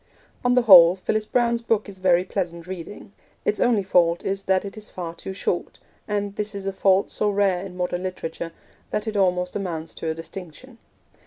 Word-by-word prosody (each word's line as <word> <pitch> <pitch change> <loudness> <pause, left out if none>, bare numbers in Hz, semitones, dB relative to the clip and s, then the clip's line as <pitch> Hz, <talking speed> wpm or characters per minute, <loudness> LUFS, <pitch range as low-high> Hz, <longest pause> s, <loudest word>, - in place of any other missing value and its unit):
On 245 0 +3
the 250 - +4
whole, 180 -5 +9
Phyllis 215 +3 -1
Browne's 235 0 +1
book 225 -2 0
is 195 -2 -11
very 180 -1 +3
pleasant 170 -3 -4
reading. 190 +3 -8 0.3
Its 210 - +1
only 230 -5 +3
fault 175 -2 +2
is 195 0 -1
that 190 +1 +2
it 195 - -7
is 215 -1 -9
far 170 -2 -6
too 170 - -7
short, 190 -2 -3 0.3
and 205 -1 -2
this 210 0 -3
is 200 -1 -6
a 195 - -2
fault 195 0 +2
so 210 - +1
rare 195 -3 +1
in 185 -2 -9
modern 180 0 -2
literature 170 -2 -5 0.4
that 210 - -2
it 220 -1 -4
almost 180 -2 +1
amounts 165 -5 -4
to 165 - -4
a 160 - -2
distinction. 190 - -10
190 Hz, 195 wpm, -23 LUFS, 180-210 Hz, 0.4 s, whole